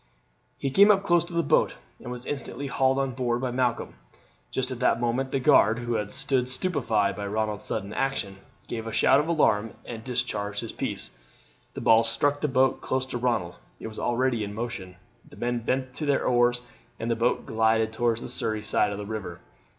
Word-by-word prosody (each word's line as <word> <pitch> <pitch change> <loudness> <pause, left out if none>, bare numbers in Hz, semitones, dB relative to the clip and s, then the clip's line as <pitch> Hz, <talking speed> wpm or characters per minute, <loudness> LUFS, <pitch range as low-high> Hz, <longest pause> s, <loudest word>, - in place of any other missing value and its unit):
He 135 - -2
came 200 +8 +7
up 195 -2 +5
close 175 -3 +3
to 175 - -11
the 170 0 +1
boat, - - +2 0.2
and 120 - -8
was 125 0 -7
instantly 145 0 -4
hauled 135 -1 +2
on 135 -1 0
board 120 -1 -1
by 125 -1 -2
Malcolm. 125 -1 -1 0.6
Just 130 0 -2
at 125 - -5
that 125 - +2
moment 125 +3 -1
the 135 - +1
guard, 120 -5 +5
who 120 0 -3
had 105 -2 -2
stood 130 -2 0
stupefied 115 - 0
by 100 0 -4
Ronald's 105 0 -2
sudden 100 -1 -3
action, 135 -8 -2 0.3
gave 115 -1 -5
a - - -4
shout 135 +4 +4
of 150 - -1
alarm 115 -10 +2
and 115 -2 -7
discharged 110 -5 -2
his 115 - -6
piece. - - -4 0.6
The - - -5
ball 115 0 +6
struck 140 +6 +1
the 150 - +1
boat 130 -1 +2
close 130 0 -1
to 125 -2 -4
Ronald. 115 -8 -1 0.2
It - - -9
was 110 - -8
already 120 -1 +1
in 100 0 -6
motion; 105 -6 -5 0.3
the - - -15
men 120 0 -1
bent 130 +2 -2
to 150 +3 -4
their 140 - +2
oars, 120 0 +3 0.4
and 115 +1 -2
the - - +2
boat 115 +2 0
glided 110 0 +2
towards 115 0 0
the - - -6
Surrey 110 -1 -2
side 110 -1 +2
of 100 - -4
the 105 - -5
river. 100 -5 -5
120 Hz, 205 wpm, -26 LUFS, 110-130 Hz, 0.6 s, came